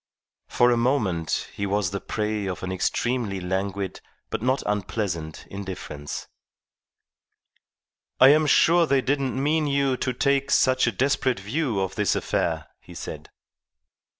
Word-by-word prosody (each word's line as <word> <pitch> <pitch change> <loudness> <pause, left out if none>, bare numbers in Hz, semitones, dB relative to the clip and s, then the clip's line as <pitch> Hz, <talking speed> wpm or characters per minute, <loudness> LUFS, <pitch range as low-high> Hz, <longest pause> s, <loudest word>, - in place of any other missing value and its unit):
For 120 0 +3
a 120 - +3
moment 110 - 0
he 100 - -3
was 100 -2 0
the 100 - -4
prey 105 -2 -2
of 95 0 -5
an 95 - -3
extremely 105 +2 -1
languid 95 +1 -3 0.3
but - - -2
not 130 +3 +1
unpleasant 95 -6 -3
indifference. 95 -7 -6 1.9
"I 130 - +9
am 155 +1 +5
sure 170 +3 +5
they 140 -2 +3
didn't 135 -1 0
mean 150 +2 +1
you 140 -2 +1
to 130 - -1
take 140 +2 +1
such 130 -1 +3
a - - +2
desperate 130 +1 +1
view 115 +2 -1
of 95 0 -2
this 105 0 +1
affair," 80 -2 -1
he - - -14
said. - - -7
110 Hz, 140 wpm, -25 LUFS, 95-135 Hz, 1.9 s, I